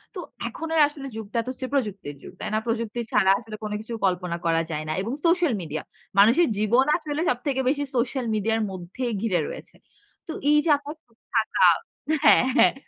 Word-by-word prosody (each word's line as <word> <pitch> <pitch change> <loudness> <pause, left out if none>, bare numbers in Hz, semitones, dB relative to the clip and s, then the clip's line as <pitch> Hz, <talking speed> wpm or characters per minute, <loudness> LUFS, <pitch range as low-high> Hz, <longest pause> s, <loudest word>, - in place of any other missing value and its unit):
তো - - -4 0.3
এখন 325 - -6
আর 315 - +5
আসলে 285 -2 -8
যুগটা 225 +1 -3
তো 255 - -4
হচ্ছে 255 0 -6
প্রযুক্তির 205 - -2
যুগ। - - -10
তাই - - -4
না? - - +2
প্রযুক্তি 230 0 -2
ছাড়া 190 - +4
আসলে 220 -2 -9
কোন 210 - -4
কিছু 225 +2 -8
কল্পনা 180 -2 0
করা 165 0 +3
যায় 155 0 -3
না। 155 - -1
এবং 225 +6 -3
Social 340 -4 +3
Media 155 -2 -4 0.4
মানুষের 235 +12 +6
জীবন 235 +6 +3
আসলে 310 -2 -4
সবথেকে 265 +2 -1
বেশি 285 +1 0
Social 255 +1 0
Media 215 +1 0
আর - - -1
মধ্যেই 190 +7 -4
ঘিরে 205 -6 +1
রয়েছে। - - -9 0.5
তো - - -4 0.2
এই 300 - +6
যে 330 - +1
আপনার 290 +2 -8
চুপ 230 -2 -32 0.2
থাকা 220 -1 +2 0.6
হ্যাঁ, 295 - +7
হ্যাঁ, - - +6
230 Hz, 195 wpm, -25 LUFS, 200-275 Hz, 0.6 s, হ্যাঁ